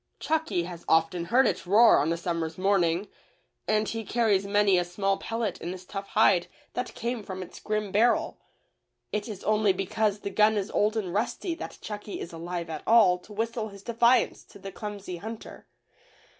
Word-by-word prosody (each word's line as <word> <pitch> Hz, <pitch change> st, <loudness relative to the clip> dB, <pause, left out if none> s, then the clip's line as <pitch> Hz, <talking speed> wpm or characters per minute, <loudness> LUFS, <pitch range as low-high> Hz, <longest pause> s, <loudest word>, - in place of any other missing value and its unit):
Chucky 315 Hz, -, 0 dB
has 170 Hz, -1 st, -8 dB
often 165 Hz, +2 st, +2 dB
heard 250 Hz, +7 st, +4 dB
it 185 Hz, -1 st, -1 dB
roar 220 Hz, +4 st, +6 dB
on 150 Hz, +3 st, +1 dB
a 170 Hz, -, 0 dB
summer's 165 Hz, -2 st, -3 dB
morning, 185 Hz, -1 st, +1 dB, 0.6 s
and 215 Hz, 0 st, +2 dB
he 225 Hz, 0 st, -3 dB
carries 210 Hz, -4 st, +1 dB
many 200 Hz, -2 st, +4 dB
a -, -, +1 dB
small 195 Hz, +3 st, -1 dB
pellet 225 Hz, -4 st, -3 dB
in 170 Hz, -, -4 dB
his 185 Hz, 0 st, -8 dB
tough 195 Hz, +1 st, -6 dB
hide 195 Hz, -5 st, +3 dB, 0.3 s
that 250 Hz, -, -4 dB
came 235 Hz, 0 st, -3 dB
from 190 Hz, -2 st, -6 dB
its -, -, -12 dB
grim 215 Hz, -2 st, -2 dB
barrel. 225 Hz, +5 st, +2 dB, 0.7 s
It 210 Hz, +2 st, -3 dB
is 205 Hz, -3 st, -7 dB
only 210 Hz, -2 st, +3 dB
because 205 Hz, +2 st, -1 dB
the 200 Hz, -, -4 dB
gun 215 Hz, 0 st, +4 dB
is 200 Hz, +1 st, -2 dB
old 215 Hz, +2 st, +1 dB
and 185 Hz, -5 st, -3 dB
rusty 235 Hz, -, -1 dB
that 330 Hz, -, -8 dB
Chucky 210 Hz, -1 st, -6 dB
is 170 Hz, -, -7 dB
alive 170 Hz, +1 st, -5 dB
at 155 Hz, -2 st, -5 dB
all 215 Hz, -6 st, +6 dB
to 195 Hz, -, -17 dB
whistle 225 Hz, +1 st, -2 dB
his 200 Hz, -1 st, -13 dB
defiance 235 Hz, +2 st, +2 dB
to -, -, -15 dB
the 195 Hz, 0 st, -8 dB
clumsy 200 Hz, -3 st, -6 dB
hunter. 220 Hz, +5 st, -9 dB
200 Hz, 185 wpm, -27 LUFS, 180-220 Hz, 0.7 s, roar